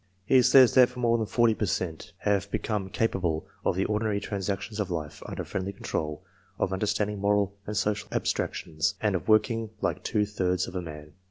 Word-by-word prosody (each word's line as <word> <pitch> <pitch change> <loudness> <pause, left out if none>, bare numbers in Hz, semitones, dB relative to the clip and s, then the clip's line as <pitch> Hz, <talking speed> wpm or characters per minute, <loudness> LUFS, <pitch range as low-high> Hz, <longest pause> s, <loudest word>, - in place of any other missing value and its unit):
He 130 +4 +6
says 130 -1 +7
that 125 -1 +5
more 120 -1 +2
than 110 - -1
forty 120 0 +3
per 105 -1 -2
cent, 85 -3 -3
have 100 -1 +1
become 105 -2 -2
capable 95 -7 0 0.2
of 95 - +1
the 95 - +1
ordinary 105 -1 0
transactions 100 +2 -3
of 100 -2 -1
life, 80 -4 -4
under - - -4
friendly 95 +1 -3
control; 75 -5 -4 0.3
of 95 - 0
understanding 105 +1 -1
moral 100 0 +2
and 105 0 -3
social 105 +1 -1
abstractions, 80 +4 -1
and 105 -2 +1
of 90 -4 -2
working 110 +1 +3
like - - -1
two 105 -2 +1
thirds 90 -3 0
of - - -8
a 90 - -1
man. 75 -3 -9
100 Hz, 185 wpm, -27 LUFS, 90-110 Hz, 0.3 s, says